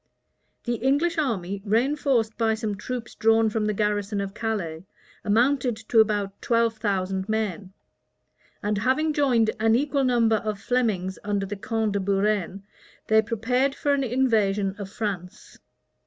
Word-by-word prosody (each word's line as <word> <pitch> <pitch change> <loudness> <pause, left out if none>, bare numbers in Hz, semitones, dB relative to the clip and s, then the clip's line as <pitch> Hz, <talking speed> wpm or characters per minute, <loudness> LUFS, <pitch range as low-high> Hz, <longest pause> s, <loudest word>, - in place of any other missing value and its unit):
The 240 -1 -1
English 285 +8 +1
army, 200 - -2
reënforced 230 +2 +1
by 225 -1 +1
some 220 -2 -3
troops 230 +3 -6
drawn 225 0 +3
from 215 0 -1
the 210 - 0
garrison 205 0 -1
of 195 0 -4
Calais, 190 -9 -3 0.4
amounted 245 +3 +2
to 225 +1 +1
about 205 -2 +1
twelve 230 -1 +1
thousand 190 -2 -2
men; 210 -3 -2 0.9
and 210 -1 0
having 285 +7 +1
joined 245 -7 +2
an 225 0 +3
equal 280 +2 +1
number 235 -3 +3
of 215 -1 -4
Flemings 210 -6 -1
under 205 -1 -1
the 200 +2 -5
count 220 +1 -1
de 200 - 0
Buren, 195 -1 0 0.5
they 220 0 +6
prepared 250 +5 0
for 285 - 0
an 280 -1 +1
invasion 215 -6 +1
of 200 -2 -6
France. 195 -4 -6
220 Hz, 145 wpm, -25 LUFS, 200-245 Hz, 0.9 s, they